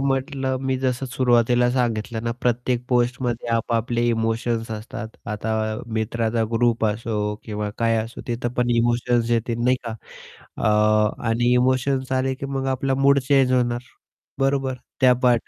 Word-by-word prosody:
म्हटलं, 135 0 -1
मी 130 - +1
जसं 130 0 -1
सुरुवातीला 120 -1 +3
सांगितलं 115 -3 -1
ना, 115 - 0
प्रत्येक 125 0 0
पोस्टमध्ये 120 -1 0
आपआपले 115 +1 0
इमोशन्स 115 0 -1
असतात. 110 +1 -6 0.2
आता 105 +1 -2 0.4
मित्राचा 115 +1 0
ग्रुप 115 -1 +2
असो 110 +2 -2 0.3
किंवा 105 -1 -3
काय 115 -1 +2
असो, 115 +3 -9
तिथं 120 0 -2
पण 120 0 +2
इमोशन्स 120 0 +1
येते 115 0 +1
नाही 125 +1 +4
का. 115 - -4 0.7
अ, 105 0 +2
आणि 120 +2 +2
इमोशन्स 130 +1 +1
आले, 130 0 +1
की 140 - -6
मग 135 0 -1
आपला 135 +1 -1
मूड 140 0 +6
चेंज 135 -3 +4
होणार, 120 -1 +1 0.6
बरोबर? 135 -1 +1 0.3
त्याचं 125 -1 +5
त्या 120 -2 +2
120 Hz, 145 wpm, -23 LUFS, 115-130 Hz, 0.7 s, मूड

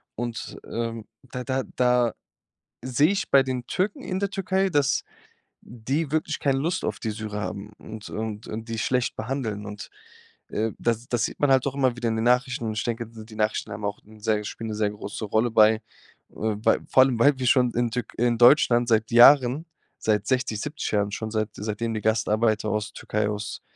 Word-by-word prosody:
Und, 120 -1 -5
ähm, 115 -1 -4 0.3
da 125 0 -4
da 130 0 -1
da 125 -2 +3 0.7
sehe 130 +5 +2
ich 195 - -2
bei 135 -1 +7
den 130 -2 -4
Türken, 210 +10 -1
in 185 +1 -3
der 200 -1 -1
Türkei, 195 0 0
dass 145 -3 +2 0.6
die 135 +6 -3
wirklich 155 0 -1
keine 135 -2 +1
Lust 170 +6 -1
auf - - -2
die 110 - -3
Syrer 105 -1 -5
haben 105 +1 -6
und 110 -1 -9
und 110 0 -5
und 115 +1 -6
die 115 - -3
schlecht 125 +1 0
behandeln. 110 -3 -3
Und, 105 0 -8 0.6
äh, 110 +1 -1
das 115 0 -1
das 120 -4 +1
sieht - - -6
man 145 -2 +4
halt 130 +1 +4
auch 140 - -3
immer 130 -3 +1
wieder 120 -1 -2
in 110 - -1
den 110 - -1
Nachrichten. 125 0 +2
Und 110 -1 -3
ich - - -1
denke, 115 -1 -3
so 110 -1 -10
die 110 -1 -13
Nachrichten 110 0 -1
haben 105 +1 -7
auch 100 0 -3
'n 110 0 -17
sehr 105 -1 0
spielen 115 +2 -6
'ne 105 - -3
sehr 105 -1 0
große 105 +1 -6
Rolle 110 +3 +1
bei 110 0 +5 0.5
äh, 110 -1 -2
bei 105 - +2
vor 130 - +6
allem 130 -3 0
weil 140 +2 +5
wir 125 - -1
schon 125 -1 +4
in 120 -1 0
Tür 125 +1 -1
in 120 0 +2
Deutschland 120 -1 +5
seit 110 0 +2
Jahren, 130 +4 +6 0.3
seit 105 -2 +1
60, 125 -5 0
70 150 +1 -4
Jahren, 105 0 +1
schon 110 +2 -4
seit 110 -1 -1
seitdem 110 +2 -3
die 110 - -3
Gastarbeiter 110 0 +1
aus 105 0 -2
Türkei, 105 0 -2
aus 105 0 -5
115 Hz, 205 wpm, -25 LUFS, 110-130 Hz, 0.7 s, bei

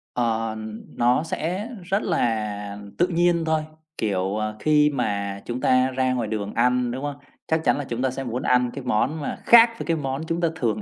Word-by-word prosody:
Ờ, 115 -2 0 0.4
nó 125 +5 +3
sẽ 180 +7 -3
rất 195 +3 0
là 105 -3 -1 0.2
tự 175 - +3
nhiên 170 -1 +2
thôi. 160 -1 +1 0.4
Kiểu, 100 -1 -1
à, 110 0 -2
khi 150 +1 +4
mà 100 -7 -2
chúng 120 +1 -4
ta 130 0 +4
ra 130 0 +1
ngoài 120 -4 -1
đường 105 -2 -3
ăn, 125 +1 +2
đúng 130 +3 -5
hông? 145 -1 -3 0.3
Chắc 160 0 +1
chắn - - +3
là 145 - -2
chúng 120 -1 -4
ta 130 - +2
sẽ 135 +1 -5
muốn 125 +1 -3
ăn 125 -1 +2
cái 140 - -6
món 130 +6 0
mà - - -4
khác 235 0 +8
với - - -4
cái 165 -1 0
món 135 0 -3
chúng 165 +1 -1
ta 170 - +3
thường 110 -7 -1
125 Hz, 210 wpm, -24 LUFS, 110-155 Hz, 0.4 s, khác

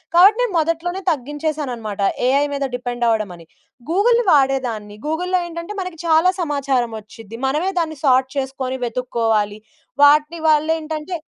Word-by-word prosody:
కాబట్టి 395 +6 +7
నేను 475 -6 0
మొదట్లోనే 335 +4 -1
తగ్గించేసాననమాట. 280 -7 -4 0.3
ఏఐ 280 +2 +3
మీద 280 -1 -1
డిపెండ్ 245 -1 -4
అవడమని. 200 -7 -1 0.4
గూగుల్‌ని 465 +6 +3
వాడేదాన్ని. 250 -7 0
గూగుల్‍లో 360 +4 0
ఏంటంటే, 335 +5 -7
మనకి 365 -3 -7
చాలా 325 +2 +4
సమాచారం 275 -6 0
వచ్చిద్ది. 225 +1 -12
మనమే 315 +8 0
దాన్ని 315 -2 -2
సోర్ట్ 260 0 +4
చేసుకోని 265 -1 -3
వెతుక్కోవాలి. 225 -3 -1 0.4
వాటి 300 +3 +5
వల్లేంటంటే, 315 +2 0
285 Hz, 120 wpm, -20 LUFS, 245-330 Hz, 0.4 s, కాబట్టి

